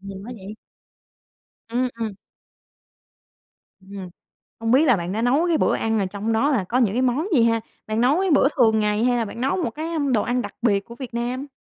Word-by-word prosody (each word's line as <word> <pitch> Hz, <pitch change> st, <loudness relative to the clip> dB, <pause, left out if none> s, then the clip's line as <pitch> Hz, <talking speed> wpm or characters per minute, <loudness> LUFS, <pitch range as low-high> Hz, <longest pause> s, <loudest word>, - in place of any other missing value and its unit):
Nhiều 195 Hz, 0 st, -8 dB
quá 245 Hz, -, -7 dB
vậy? 200 Hz, +1 st, -9 dB, 1.1 s
Ừm, 245 Hz, +2 st, 0 dB
ừm. 220 Hz, -2 st, -3 dB, 1.8 s
Ừm. 195 Hz, -2 st, -7 dB, 0.5 s
Không 225 Hz, +1 st, -1 dB
biết 280 Hz, +5 st, +5 dB
là 250 Hz, -, +5 dB
bạn 175 Hz, -1 st, -4 dB
đã 220 Hz, +3 st, -2 dB
nấu 275 Hz, +9 st, +2 dB
cái 330 Hz, -, +2 dB
bữa -, -, +2 dB
ăn 225 Hz, 0 st, 0 dB
là 195 Hz, -, +1 dB
trong 205 Hz, +4 st, -3 dB
đó 275 Hz, +7 st, +2 dB
là 230 Hz, -8 st, +1 dB
có 230 Hz, +7 st, -1 dB
những 225 Hz, -5 st, +2 dB
cái 255 Hz, -, +1 dB
món 260 Hz, +7 st, +1 dB
gì 235 Hz, -, +5 dB
ha? 230 Hz, 0 st, +3 dB, 0.3 s
Bạn 220 Hz, +2 st, 0 dB
nấu 280 Hz, +8 st, +3 dB
cái 385 Hz, -2 st, +1 dB
bữa 280 Hz, -2 st, +5 dB
thường 220 Hz, -3 st, +4 dB
ngày 210 Hz, +1 st, +1 dB
hay 245 Hz, 0 st, +2 dB
là 230 Hz, -, 0 dB
bạn 230 Hz, +3 st, -7 dB
nấu 270 Hz, +7 st, +1 dB
một -, -, 0 dB
cái, 310 Hz, +2 st, -6 dB
à, 335 Hz, -1 st, -3 dB, 0.2 s
đồ 215 Hz, -, +3 dB
ăn 245 Hz, +3 st, 0 dB
đặc -, -, -7 dB
biệt 205 Hz, -4 st, +3 dB
của 235 Hz, -, -11 dB
Việt 250 Hz, -2 st, -8 dB
Nam? 245 Hz, +4 st, -3 dB
235 Hz, 235 wpm, -23 LUFS, 215-260 Hz, 1.8 s, biết